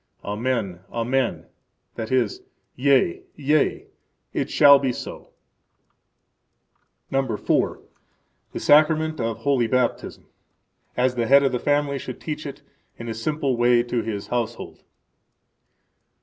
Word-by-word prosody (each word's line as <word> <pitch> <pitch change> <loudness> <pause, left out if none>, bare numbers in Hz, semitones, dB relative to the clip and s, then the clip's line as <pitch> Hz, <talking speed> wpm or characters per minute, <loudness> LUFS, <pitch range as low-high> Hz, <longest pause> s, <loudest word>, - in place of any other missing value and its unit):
Amen, 105 -3 -2
Amen; 125 +2 -1 0.5
that 110 0 -6
is, 125 -5 0 0.3
Yea, 130 -9 +2
yea, 150 +1 +1 0.5
it - - -2
shall 140 -1 +7
be 135 -2 0
so. - - -8 1.8
The 135 -6 +1 0.9
Sacrament 155 +1 +3
of 115 -1 -2
Holy 120 0 +1
Baptism 125 0 -1 0.7
As 125 0 +2
the 120 -2 -1
head 140 +2 +6
of 135 - +2
the 125 - -1
family 145 0 0
should 130 - -7
teach 155 -1 -5
it 140 0 -9 0.3
in 115 0 -7
a - - -2
simple 140 +3 -1
way 120 0 +3
to 120 -1 -2
his 105 -3 -4
household. 120 -2 -4
130 Hz, 115 wpm, -23 LUFS, 115-140 Hz, 1.8 s, shall